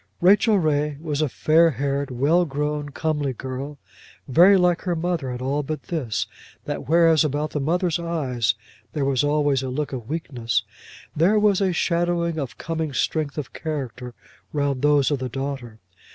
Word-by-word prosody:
Rachel 205 +4 +5
Ray 150 -3 0
was 155 -2 -2
a 155 - +1
fair 160 +6 +4
haired, 140 +1 -2
well 145 +8 +2
grown, 150 -1 -2
comely 150 -2 -1
girl, 130 +4 -6 0.5
very 180 +9 +6
like 180 -1 +2
her 180 -2 -1
mother 165 -4 -2
in 125 0 -5
all 140 +3 0
but 155 +2 -5
this, 120 - -1 0.4
that 145 -2 -5
whereas 165 -1 +5
about 150 +1 -1
the 150 - -2
mother's 170 +3 0
eyes 130 -10 0 0.4
there 145 -3 -1
was 135 -1 +1
always 145 -2 +2
a 130 - -4
look 145 +2 -3
of 120 -4 -6
weakness, 120 -8 -1 0.5
there 175 +8 +4
was 210 -2 +3
a 190 -2 +2
shadowing 170 -1 0
of 135 -4 -5
coming 160 -2 -3
strength 150 +3 -1
of 150 - -5
character 130 -6 -5 0.4
round 140 -3 -1
those 145 -1 +3
of 145 - 0
the 130 -1 -3
daughter. 135 -4 -5
150 Hz, 165 wpm, -23 LUFS, 135-165 Hz, 0.5 s, very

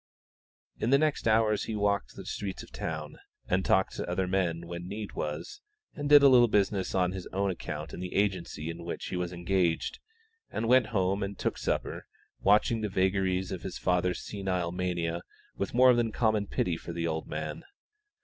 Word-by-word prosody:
In 110 - 0
the 140 - +6
next 150 -4 +1
hours 110 -1 +3
he 110 - -3
walked 100 -9 0
the - - -9
streets 100 -2 -4
of - - -15
the - - -10
town, 75 -2 -4 0.3
and 95 +1 +1
talked 95 0 +2
to - - -4
other 90 +1 0
men 90 -3 0
when 85 +1 -6
need 105 +1 -5
was, 75 +2 -5 0.3
and 145 -2 -3
did 145 -1 +9
a - - +9
little 125 -3 +7
business 100 -3 +1
on 90 -1 +2
his 95 -1 -6
own 100 +1 0
account 75 -3 -6
in - - -6
the 90 0 -5
agency 90 -5 -1
in 85 +1 -9
which 85 - -5
he - - -3
was 90 -1 -2
engaged, 85 -1 0 0.5
and 115 - -2
went 125 -2 +5
home 100 -2 0
and 100 0 -3
took - - -1
supper, - - -2 0.3
watching 105 +3 +3
the 105 - -1
vagaries 95 -1 +1
of 95 - -4
his 95 - -5
father's 90 0 +1
senile 95 -4 -2
mania 85 -2 -2 0.3
with 100 - -3
more 130 0 +7
than 120 -2 +1
common 110 -3 +1
pity 85 -3 0
for 85 - -7
the 85 0 -2
old 80 -1 -2
man. 75 0 -4
95 Hz, 195 wpm, -29 LUFS, 85-105 Hz, 0.5 s, did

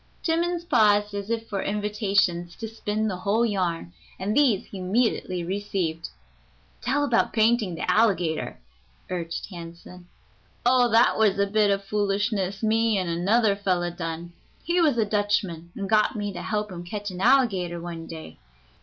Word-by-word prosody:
Timmans 340 +1 0
paused 210 - +3
as 200 +1 -5
if 225 -1 -2
for 195 -2 -3
invitations 200 -5 0
to 225 - -6
spin 215 -1 -2
the 190 -4 -2
whole 210 +5 +1
yarn, 175 - -2 0.2
and 205 +3 -2
these 255 -10 +3
he 195 - -9
immediately 185 -2 0
received. 180 -3 -3 0.7
"Tell 280 +4 +1
about 245 -5 +1
painting 220 -4 +2
the - - -4
alligator," 180 -5 +1 0.5
urged 170 -2 -3
Hansen. 175 +1 -10 0.6
"Oh, 245 0 +4
that 230 +1 +4
was 210 -3 +3
a 200 - +3
bit 210 +1 +2
of 200 0 0
foolishness 200 -1 -1
me 225 0 +2
an' 185 -2 -1
another 200 +5 +2
fellow 180 -3 0
done. 170 0 -6 0.3
He 345 +1 +1
was 300 -7 +3
a 220 - +3
Dutchman, 205 -5 -1
and 200 - -4
got 215 +1 +3
me 205 -1 -3
to 175 - -6
help 210 +3 -2
him 175 -1 -7
catch 205 +3 -5
an 180 0 -7
alligator 200 -9 +3
one 165 -1 -7
day. 160 - -9
200 Hz, 160 wpm, -25 LUFS, 180-220 Hz, 0.7 s, Oh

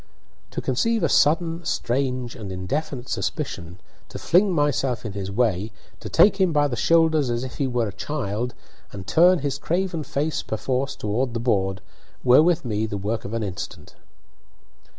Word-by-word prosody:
To - - -4
conceive 225 - +1
a 165 - +3
sudden, 165 +4 +2
strange, 130 -3 -1
and 100 -4 -7
indefinite 120 - -3
suspicion, 85 +2 -4 0.3
to - - -7
fling 190 +3 +3
myself 140 -6 0
in 110 - -3
his 100 -1 -4
way, 105 -1 0 0.3
to - - -7
take 200 -1 +5
him 185 -2 +4
by 145 -1 +3
the 130 - -3
shoulders 160 +3 +3
as 120 +1 -1
if 130 - -7
he 140 - +1
were 120 -3 0
a - - -9
child, 120 -4 -3 0.4
and 95 -2 -8
turn 175 - +5
his 140 0 -2
craven 175 +1 -1
face, 150 +2 -1
perforce, 130 +4 -2
toward 120 +4 -2
the - - 0
board, 95 -4 0 0.4
were 125 +3 +7
with 170 -2 +2
me 110 -1 -1
the 105 - -4
work 105 +3 -3
of 100 - -6
an 115 - -1
instant. 95 -3 -6
125 Hz, 170 wpm, -24 LUFS, 110-155 Hz, 0.4 s, were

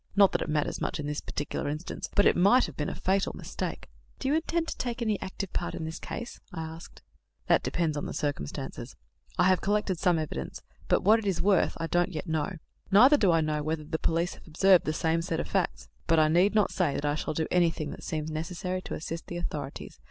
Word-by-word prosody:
Not 200 -1 +6
that - - -1
it - - -3
matters 150 -1 -1
much - - -2
in 150 - -3
this 150 0 -3
particular 145 0 -3
instance; 155 +4 -5
but 205 - +5
it - - +5
might 200 +8 +5
have 155 - -8
been 150 - -2
a - - -5
fatal 195 +1 0
mistake." - - -5 0.3
"Do 265 - -3
you 280 - +2
intend 330 +1 0
to - - -5
take 240 -1 -2
any 220 -4 0
active 190 0 -5
part 175 - -2
in 160 - -4
this 160 +1 -5
case?" 240 - -6
I 160 - -4
asked. 160 +1 -10 0.4
"That - - +4
depends 165 -3 -1
on 145 - -3
circumstances. 145 - -4 0.4
I - - +4
have 185 0 +4
collected 205 -3 0
some 180 -3 +3
evidence, 150 - -4 0.2
but - - +2
what 215 +4 +6
it 215 - -4
is 190 -3 0
worth 195 -2 +2
I 165 - -1
don't 175 +3 +1
yet 160 - -4
know. 160 +2 -1 0.4
Neither 250 +9 +7
do 200 -9 +4
I 165 -1 +3
know 155 -1 0
whether 155 +1 -2
the 160 +1 -3
police 170 +2 0
have - - -16
observed 185 +3 +5
the 155 - 0
same 160 +1 +1
set 165 -1 -2
of - - -3
facts; 190 -4 -1 0.2
but 165 - +4
I 155 -1 +5
need 180 +6 +4
not 210 -2 +3
say 165 -7 +1
that 145 - -2
I 145 - +2
shall 150 0 -3
do 160 - 0
anything 165 -4 +1
that - - -9
seems 155 0 -3
necessary 180 +3 -3
to - - -5
assist 165 +2 -6
the 175 - -5
authorities. 145 -5 -5
170 Hz, 235 wpm, -28 LUFS, 155-195 Hz, 0.4 s, Neither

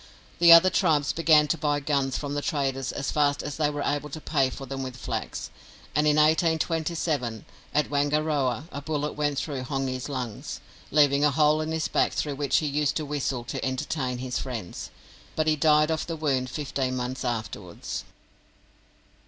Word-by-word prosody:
The 170 0 +8
other 170 +2 +9
tribes 155 -6 +2
began 155 -2 +5
to 165 - 0
buy 145 -1 +1
guns 140 -2 0
from 145 -1 -4
the 145 - -1
traders 135 -3 -1
as 135 - -3
fast 145 -1 +1
as 145 - -5
they 150 -2 +2
were 145 -1 -3
able 145 +1 -1
to 155 - -6
pay 140 -4 +1
for 135 +1 -8
them 135 +1 -5
with 130 -1 -6
flax; - - -4 0.4
and 150 +1 +2
in 150 - +4
1827, 160 -5 +1 0.3
at 150 -1 +1
Wangaroa, 145 -2 0
a 140 - -5
bullet 150 0 -2
went 145 -1 -1
through 140 -3 -3
Hongi's 130 0 -3
lungs, 125 -6 -5 0.3
leaving 145 -1 +4
a 150 - +5
hole 150 +2 +3
in 155 +1 -3
his 160 0 -1
back - - +1
through 145 - -1
which 140 -1 +1
he 155 - +1
used 145 0 0
to 155 - -2
whistle 140 -4 -2
to - - -5
entertain 130 0 -2
his 125 0 -3
friends; 115 -9 -6 0.5
but 155 - +1
he 155 0 +3
died 150 0 +4
of 160 - -2
the 165 - -3
wound 135 -5 0
fifteen 135 -2 -2
months 125 +2 -3
afterwards. 105 -7 -4
145 Hz, 180 wpm, -26 LUFS, 130-155 Hz, 0.5 s, other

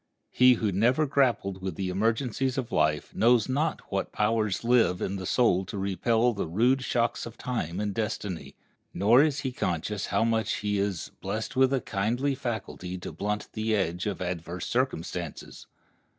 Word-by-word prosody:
He 125 0 +6
who 110 -2 -1
never 120 - +3
grappled 120 -9 +1
with 95 -3 -4
the 95 +1 -2
emergencies 115 +6 0
of 130 -3 -3
life 75 -1 +1
knows 120 -1 +4
not 150 +5 0
what 100 -1 -2
power 110 0 +1
lives 115 -6 +3
in 100 - -2
the 95 -1 -5
soul 105 -7 +3
to 100 - -6
repel 110 +5 +1
the 100 - -3
rude 120 +10 +2
shocks 120 -2 0
of 115 - -11
time 100 -8 -3
and 105 -1 -1
destiny, 105 -4 -4 0.4
nor 110 +8 +5
is 145 -2 +1
he 130 - -2
conscious 100 -2 -2
how - - +1
much 115 -1 +1
he 105 -1 -1
is 100 -4 -2
"Blest - - -4
with 130 0 +4
a 135 -2 +1
kindly 120 +9 0
faculty 110 -8 -5
to 90 - -7
blunt 105 +1 -3
The 110 0 0
edge 90 0 -1
of 95 -3 -3
adverse 90 -1 -4
circumstances." 90 - -3
110 Hz, 170 wpm, -27 LUFS, 95-125 Hz, 0.4 s, He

